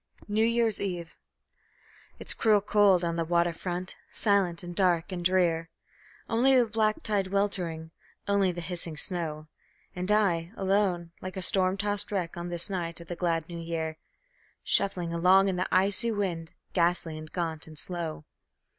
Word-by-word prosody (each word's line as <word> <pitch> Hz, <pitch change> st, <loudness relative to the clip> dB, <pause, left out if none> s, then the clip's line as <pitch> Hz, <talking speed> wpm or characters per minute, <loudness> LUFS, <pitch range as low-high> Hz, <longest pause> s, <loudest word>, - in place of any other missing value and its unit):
New 215 Hz, +1 st, +1 dB
Year's 230 Hz, -2 st, +1 dB
Eve 175 Hz, -4 st, -4 dB, 1.0 s
It's -, -, 0 dB
cruel 215 Hz, -2 st, +3 dB
cold 200 Hz, -3 st, +3 dB
on 170 Hz, -1 st, -1 dB
the 165 Hz, -, +1 dB
water 170 Hz, +1 st, +1 dB
front, 180 Hz, +2 st, -5 dB
silent 195 Hz, -5 st, +2 dB
and 175 Hz, 0 st, -7 dB
dark 175 Hz, -2 st, +2 dB
and 175 Hz, -1 st, -4 dB
drear; 170 Hz, -2 st, +2 dB, 0.6 s
Only 255 Hz, +4 st, +4 dB
the 245 Hz, -, +5 dB
black 215 Hz, -1 st, 0 dB
tide 205 Hz, -3 st, +1 dB
weltering, 180 Hz, -5 st, -1 dB, 0.4 s
only 200 Hz, -2 st, +2 dB
the 175 Hz, 0 st, -6 dB
hissing 170 Hz, -2 st, -5 dB
snow; 155 Hz, -4 st, -1 dB, 0.5 s
And 180 Hz, +2 st, -2 dB
I, 185 Hz, -4 st, +1 dB
alone, 190 Hz, -3 st, 0 dB
like 185 Hz, +1 st, -7 dB
a 190 Hz, -, -2 dB
storm 185 Hz, +1 st, +2 dB
tossed 205 Hz, 0 st, +1 dB
wreck, 180 Hz, -4 st, -2 dB
on 175 Hz, 0 st, -5 dB
this 175 Hz, -1 st, -1 dB
night 175 Hz, -4 st, -4 dB
of 170 Hz, -, -12 dB
the 175 Hz, -, -3 dB
glad 165 Hz, -2 st, -1 dB
New 170 Hz, -1 st, -7 dB
Year, 160 Hz, -1 st, -4 dB, 0.7 s
Shuffling 180 Hz, -4 st, 0 dB
along 185 Hz, +3 st, +4 dB
in 190 Hz, -, -1 dB
the 180 Hz, -, -1 dB
icy 195 Hz, +5 st, +4 dB
wind, 180 Hz, -7 st, -3 dB, 0.2 s
ghastly 170 Hz, -2 st, +1 dB
and 155 Hz, 0 st, -9 dB
gaunt 165 Hz, -3 st, -3 dB
and 155 Hz, -1 st, -12 dB
slow. 165 Hz, -2 st, -4 dB
180 Hz, 165 wpm, -28 LUFS, 170-200 Hz, 1.0 s, the